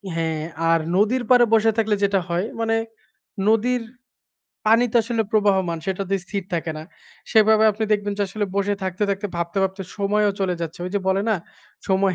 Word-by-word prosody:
হ্যাঁ, 160 -1 -1 0.3
আর 165 0 +4 0.2
নদীর 220 +6 +2
পাড়ে 245 -1 +6
বসে 225 0 +4
থাকলে 220 -2 +2
যেটা 200 -1 +3
হয়, 175 +3 0 0.2
মানে 225 0 +1 0.7
নদীর 240 +3 +2 0.9
পানি 225 +3 +5
তো - - +3
আসলে 230 0 -1
প্রবাহমান। 190 -5 +2
সেটাতে 195 0 -2
স্থির 200 +2 -4
থাকে 165 -1 -2
না। - - -7 0.5
সেভাবে 220 -1 +5
আপনি 220 +2 -2
দেখবেন 205 -1 0
যে, - - +2
আসলে 205 +2 -2
বসে 200 +1 +1
থাকতে, 185 +1 -3
থাকতে 200 +1 -2
ভাবতে, 170 +2 -4
ভাবতে 190 +1 -2
সময়ও 205 +1 +2
চলে 185 -2 +1
যাচ্ছে। 165 0 -5
ওই - - -5
যে 205 - +1
বলে 190 +1 +2
না? - - +3 0.5
সময় 190 -1 +2
205 Hz, 180 wpm, -22 LUFS, 190-220 Hz, 0.9 s, পাড়ে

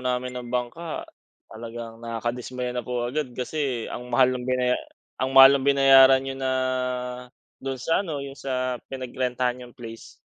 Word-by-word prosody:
namin 125 0 -2
ng 125 -1 -6
bangka, 125 +7 -3 0.4
talagang 115 0 -8
nakakadismaya 120 +2 -4
na 120 - -2
po 120 0 -2
agad 135 -1 -3
kasi 130 -2 -2
ang 125 0 -7
mahal 130 +1 +4
ng 125 - -6
binaya 125 -1 +2 0.4
ang 130 0 0
mahal 135 +1 +9
ng 135 - -3
binayaran 135 -1 +7
niyo 135 0 -4
na, 135 -1 -1 1.1
do'n 135 -1 -3
sa 165 +8 +1
ano, 150 -6 -4
yung 140 0 -8
sa 130 -2 -2 0.2
pinagrentahan 125 -1 -2
niyong 125 -1 -11
place. 115 -2 -11
125 Hz, 155 wpm, -25 LUFS, 125-135 Hz, 1.1 s, mahal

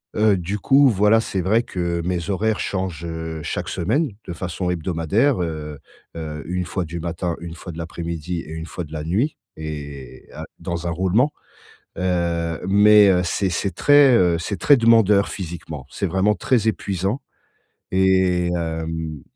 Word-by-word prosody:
Heu, 105 -2 +4
du 95 +4 -3
coup, 135 +5 +5
voilà, 105 +2 +4
c'est 95 -4 -2
vrai 110 +6 +2
que 85 -5 -3
mes 90 +2 -2
horaires 110 +2 0
changent, 95 -4 -3
heu, 80 -1 -5
chaque - - -3
semaine 135 - 0 0.2
de 85 - -5
façon 90 +1 -3
hebdomadaire, 90 - +1
heu, 75 -3 -5 0.4
heu, 75 -2 -6
une 90 0 -2
fois 90 +1 -2
du 85 +1 -6
matin, 85 +1 -3
une 85 -1 -7
fois 85 +1 -8
de 80 - -10
l'après-midi 85 0 -4
et 80 - -9
une 80 0 -6
fois 85 +3 -6
de 75 - -12
la 75 -1 -4
nuit 110 - 0 0.2
et 75 -4 -8
heu, - - -7 0.2
dans 85 0 -4
un - - 0
roulement, 95 - +2 0.7
heu, 85 -2 -1
mais 105 +1 +7
heu, 90 -1 +3
c'est 95 +2 0
c'est 95 +3 -1
très, 145 -3 +6
heu, 90 -5 +3
c'est 90 +4 -4
très 145 - +6
demandeur, 115 -4 +4
physiquement. 80 -7 -7
C'est 100 - -3
vraiment 95 +4 +2
très 115 -4 +1
épuisant 100 +3 -1 0.7
et 95 -2 +3
hem, 80 -3 -4
90 Hz, 165 wpm, -22 LUFS, 80-100 Hz, 0.7 s, mais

